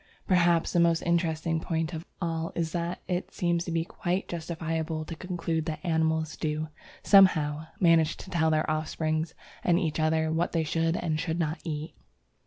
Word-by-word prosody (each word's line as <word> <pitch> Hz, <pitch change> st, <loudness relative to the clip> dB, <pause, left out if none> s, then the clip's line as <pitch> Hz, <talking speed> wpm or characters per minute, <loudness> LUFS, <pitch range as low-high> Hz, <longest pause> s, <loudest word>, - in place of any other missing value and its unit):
Perhaps 175 Hz, -3 st, +3 dB
the 175 Hz, -, +3 dB
most 170 Hz, -1 st, +3 dB
interesting 165 Hz, -1 st, +1 dB
point 160 Hz, 0 st, -2 dB
of 160 Hz, +1 st, -6 dB
all 165 Hz, -2 st, -2 dB
is 165 Hz, -2 st, -1 dB
that 170 Hz, +1 st, -3 dB
it 180 Hz, 0 st, -2 dB
seems 170 Hz, -1 st, 0 dB
to 170 Hz, -, -4 dB
be 165 Hz, 0 st, 0 dB
quite 180 Hz, +2 st, -2 dB
justifiable 160 Hz, -1 st, -3 dB
to 165 Hz, -, -6 dB
conclude 165 Hz, -2 st, -2 dB
that 155 Hz, -1 st, -3 dB
animals 160 Hz, -2 st, +1 dB
do, 155 Hz, 0 st, -2 dB, 0.3 s
somehow, 160 Hz, -6 st, +5 dB
manage 165 Hz, -3 st, +4 dB
to 190 Hz, -, -10 dB
tell 160 Hz, -2 st, +2 dB
their 155 Hz, 0 st, +1 dB
offspring 155 Hz, +1 st, -1 dB, 0.4 s
and 175 Hz, -1 st, +3 dB
each 160 Hz, -4 st, -1 dB
other 160 Hz, 0 st, +2 dB
what 165 Hz, +2 st, 0 dB
they 165 Hz, -2 st, +2 dB
should 165 Hz, +2 st, 0 dB
and 155 Hz, -3 st, -1 dB
should 165 Hz, 0 st, -2 dB
not 160 Hz, -1 st, -1 dB
eat. 155 Hz, -2 st, -4 dB
165 Hz, 175 wpm, -28 LUFS, 160-170 Hz, 0.4 s, somehow